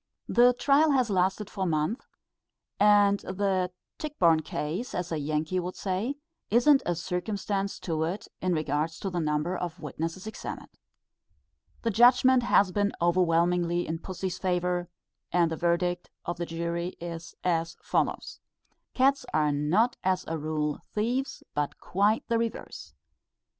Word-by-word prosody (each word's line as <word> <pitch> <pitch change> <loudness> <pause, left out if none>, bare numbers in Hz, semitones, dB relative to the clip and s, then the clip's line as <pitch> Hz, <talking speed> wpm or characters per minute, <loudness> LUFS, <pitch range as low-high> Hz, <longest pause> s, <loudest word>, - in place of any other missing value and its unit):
The 245 +1 +5
trial 285 +5 +4
has 255 -5 +2
lasted 190 +2 +1
for 190 -2 -3
months, 165 - -1 0.7
and 205 -1 +5
the 190 -1 -1 0.3
Tichborne 180 - +3
Case, 160 +9 -4
as 180 -1 -3
a 160 - -1
Yankee 155 +4 -1
would 180 +1 -4
say, 200 +8 -2 0.3
isn't 270 +5 +5
a 175 - +1
circumstance 195 +3 -2
to 160 -3 -2
it 185 +6 -4
in 185 -1 +1
regard 155 0 0
to 195 +4 -5
the 175 - -1
number 155 +3 0
of 175 -1 -4
witnesses 165 +4 -5
examined. 220 - -7 1.1
The 230 - +1
judgment 250 +3 +6
has 200 -5 +3
been 205 +1 0
overwhelmingly 175 0 +2
in 160 +1 -3
pussy's 185 0 -5
favour, 180 -1 0 0.4
and 170 -1 +3
the - - -1
verdict 175 +1 0 0.2
of 175 0 -3
the 170 0 -3
jury 170 +2 -3
as 170 -1 -7 0.5
follows: - - -1 0.6
"_Cats 270 +2 +3
are 150 -1 +3
not 170 +12 +2
as 185 -1 +1
a 165 - -2
rule 150 -1 -2 0.2
thieves, 245 +6 -1
but 145 -1 -2
quite 205 +4 +1
the 230 -1 +1
reverse. 230 -1 -5
180 Hz, 140 wpm, -28 LUFS, 165-210 Hz, 1.1 s, judgment